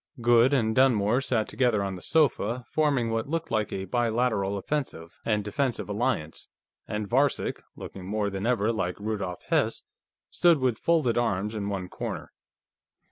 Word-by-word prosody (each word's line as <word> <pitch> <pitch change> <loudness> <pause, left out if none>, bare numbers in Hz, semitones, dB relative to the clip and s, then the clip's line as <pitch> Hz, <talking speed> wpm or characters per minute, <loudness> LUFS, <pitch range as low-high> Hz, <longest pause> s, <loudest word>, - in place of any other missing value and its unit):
Goode 120 +2 +5
and 110 -6 +1
Dunmore 120 -2 +3
sat 120 -4 0
together 120 -6 +1
on 95 -1 -3
the 90 - -8
sofa, 125 - +1
forming 140 -7 +1
what 115 +3 -2
looked 165 +1 -3
like 110 -2 0
a 95 - -3
bilateral 110 -2 0
offensive 100 - -4
and 105 -2 +1
defensive 130 +3 -2
alliance, 100 -7 -2 0.4
and 105 -1 -3
Varcek, 135 +5 +1
looking 95 -1 -9
more 105 0 -1
than 100 +3 -3
ever 115 -2 +2
like 90 -4 -2
Rudolf 100 -4 -4
Hess, - - +1 0.5
stood 175 -2 +4
with 130 -4 0
folded 155 -9 +2
arms 105 -2 -1
in 100 -2 -3
one 95 -2 -3
corner. - - -6
110 Hz, 155 wpm, -27 LUFS, 100-125 Hz, 0.5 s, Goode